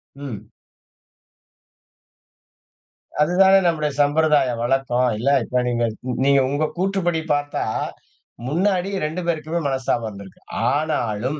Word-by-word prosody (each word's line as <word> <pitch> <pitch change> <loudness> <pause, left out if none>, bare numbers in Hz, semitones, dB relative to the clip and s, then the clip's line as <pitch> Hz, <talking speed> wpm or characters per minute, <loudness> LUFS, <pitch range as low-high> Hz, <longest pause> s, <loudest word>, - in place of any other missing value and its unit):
ம். 115 -7 -8 2.7
அதுதானே 190 +4 +5
நம்முடைய 150 -3 0
சம்பிரதாயம் 145 -5 +2
வழக்கம் 125 0 +1
இல்ல. 125 +5 0 0.2
இப்ப 125 0 0
நீங்க 120 -1 0 0.4
நீங்க 140 0 +5
உங்க 145 +2 0
கூற்றுப்படி 180 -3 0
பார்த்தா, 145 0 -2 0.8
முன்னாடி 185 +5 +1 0.2
2 160 +4 -3
பேருக்குமே 165 0 -1
மனஸ்தபம் 130 -3 -1
இருந்துருக்கும். 100 -2 -13 0.3
ஆனாலும் 140 -3 -1
145 Hz, 95 wpm, -21 LUFS, 125-165 Hz, 2.7 s, அதுதானே